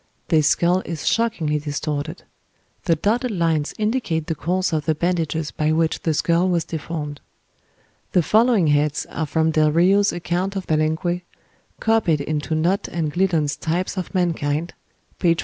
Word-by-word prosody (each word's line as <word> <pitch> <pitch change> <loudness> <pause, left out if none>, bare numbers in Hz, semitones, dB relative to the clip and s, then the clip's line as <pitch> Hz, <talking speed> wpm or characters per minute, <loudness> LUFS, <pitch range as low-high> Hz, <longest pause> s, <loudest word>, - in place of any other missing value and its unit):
This 155 -3 +4
skull 175 +2 +3
is 165 -4 -6
shockingly 195 -10 +1
distorted. 150 +2 -4 0.6
The 170 - +3
dotted 230 - 0
lines 165 -7 0
indicate 210 -8 -1
the 165 - -2
course 180 +4 -1
of 155 -2 -1
the 160 - +1
bandages 160 -2 -1
by 155 0 0
which 160 0 +1
the 160 -2 0
skull 170 +4 +2
was 170 -2 +1
deformed. 155 -2 -5 0.9
The 180 - +4
following 220 -1 +4
heads 150 0 +1
are 160 - -2
from 160 +2 +1
Del 155 -1 +3
Rio's 195 +5 +4
"Account 175 +3 -2
of 190 -2 -3
Palenque," 160 +3 0 0.6
copied 220 -9 +2
into 155 +2 -2
Nott 175 +5 +1
and 155 -3 -3
Gliddon's 170 -6 +1
"Types 175 +4 -2
of 185 -2 -4
Mankind," 165 -2 0 0.5
p. 170 -1 +3
440. - - -9
165 Hz, 155 wpm, -22 LUFS, 155-185 Hz, 0.9 s, This